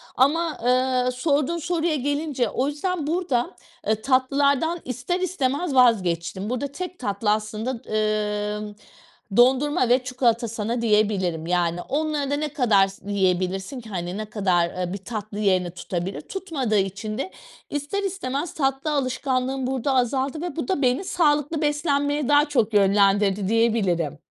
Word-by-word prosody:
ama, 310 +5 +2
ııı, 255 0 +2
sorduğun 285 +5 0
soruya 335 -1 0
gelince, 285 -3 -1
o 265 +2 -1
yüzden 300 +1 -2
burada, 320 -8 -1 0.3
ııı, 215 0 +1
tatlılardan 280 +5 +2
ister 255 +9 -2
istemez 310 -3 -1
vazgeçtim. 190 -5 +2
Burada 255 +3 -2
tek 365 +3 -6
tatlı 210 -2 0
aslında, 215 +2 -2 0.9
ımm, 210 -1 -7 0.6
dondurma 260 +2 +4
ve 250 +1 +4
çikolata 245 -2 +1
sana 230 +2 -3
diyebilirim 200 -7 +1
yani, 175 -1 0
onları 295 -1 -1
da - - +2
ne 300 0 -2
kadar 220 -9 +4
s 195 +1 -9
yiyebilirsin 190 +5 0
ki, 225 - -12
hani, 180 -1 -4
ne 215 - -3
kadar, 180 -5 +1
ııı, 180 0 -2
bir - - -3
tatlı 210 +1 -6
yerini 185 -4 +2
tutabilir? 180 +1 -4
Tutmadığı 285 - -2
için 200 +3 -2
de 325 +8 -3 0.4
ister 295 +8 -3
istemez 335 -5 -3
tatlı 270 +1 0
alışkanlığım 260 -1 -1
burada 265 +1 0
azaldı 265 +4 0
ve 350 -1 -4
bu 320 - -3
da 375 -7 0
beni 255 +6 +2
sağlıklı 300 -3 +1
beslenmeye 290 -2 0
daha 290 +1 +5
çok 230 -7 0
yönlendirdi 200 0 +3
diyebilirim 195 -9 +1
255 Hz, 145 wpm, -24 LUFS, 205-290 Hz, 0.9 s, daha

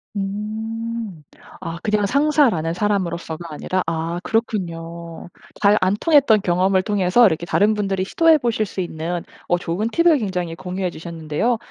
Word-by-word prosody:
음. 215 -1 -4 0.4
아 165 0 -5
그냥 210 -1 +1
상사라는 260 - +2
사람으로서가 170 -4 -2
아니라 185 +4 -2
아 165 +1 -2
그렇군요. 170 -7 -3 0.3
잘 205 0 +5
안 185 +2 +2
통했던 285 -10 +4
경험을 185 +1 +2
통해서 205 +4 +3
이렇게 170 -1 -1
다른 210 +4 +3
분들이 195 -2 -1
시도해 325 - +4
보실 230 -4 0
수 190 0 -5
있는 170 0 -4 0.2
어 175 - +2
좋은 175 +5 -2
팁을 335 0 +4
굉장히 180 -7 -3
공유해 185 +1 -3
주셨는데요. 165 +7 -2
190 Hz, 335 characters per minute, -21 LUFS, 170-220 Hz, 0.4 s, 잘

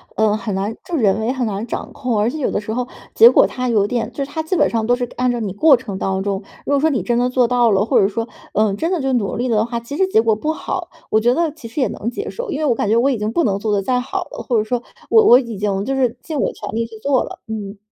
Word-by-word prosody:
呃， 215 -1 +2
很 210 -3 -4
难 200 +3 -2
就 355 - -3
人 210 -7 +2
为 220 +3 0
很 260 -2 -1
难 210 0 -3
掌 - - -5
控。 250 -5 -2
而 210 +2 +2
且 310 - -5
有 275 - 0
的 205 - -1
时 215 +1 -5
候 250 +1 -2 0.3
结 465 - +9
果 - - +5
它 255 0 -3
有 215 -4 +2
点 225 0 -2
就 280 - -3
是 275 - -8
它 320 - -2
基 320 +4 -2
本 - - +3
上 225 -1 -1
都 245 - +4
是 250 - -4
按 250 0 +1
照 240 -1 -1
你 205 -3 -2
过 285 +8 +6
程 230 -6 -6
当 190 0 -1
中， 200 -1 -2 0.2
如 - - -2
果 285 - +3
说 315 +3 +3
你 250 - -1
真 235 +5 0
的 245 +1 +2
做 250 -1 +3
到 240 -1 +3
了， 195 0 +3
或 220 - +3
者 195 - +4
说， 225 +3 -3 0.3
嗯， 210 -1 +2
真 330 - -1
的 360 -5 0
就 270 0 0
努 225 -6 0
力 245 +2 -1
的 220 -1 +2
话， 235 0 -3
其 280 +5 -7
实 380 - +3
结 300 -12 +3
果 225 -1 +2
不 305 +9 -2
好， - - -4 0.2
我 215 - +3
觉 240 +3 +3
得 330 +2 0
其 290 -6 -11
实 235 +6 -3
也 - - +3
能 230 - -4
接 405 - -5
受。 - - -6
因 285 - -2
为 310 - 0
我 265 - +3
感 215 - -2
觉 220 - +3
我 255 +4 +3
已 250 - -1
经 210 +1 -2
不 335 - +1
能 200 -6 0
做 210 0 -1
得 200 - +1
再 250 +5 0
好 370 +9 -3
了， - - -6
或 245 - +2
者 215 - +2
说 235 +2 -2 0.3
我 445 -1 +6
我 245 - +8
已 235 -5 -6
经 195 -1 -1
就 270 - -2
是 255 -3 0
尽 310 -3 -4
我 - - +1
全 - - -8
力 230 +1 -1
去 225 -1 -11
做 270 0 +2
了。 - - -9
嗯。 210 -2 -6
235 Hz, 345 characters per minute, -19 LUFS, 215-270 Hz, 0.3 s, 结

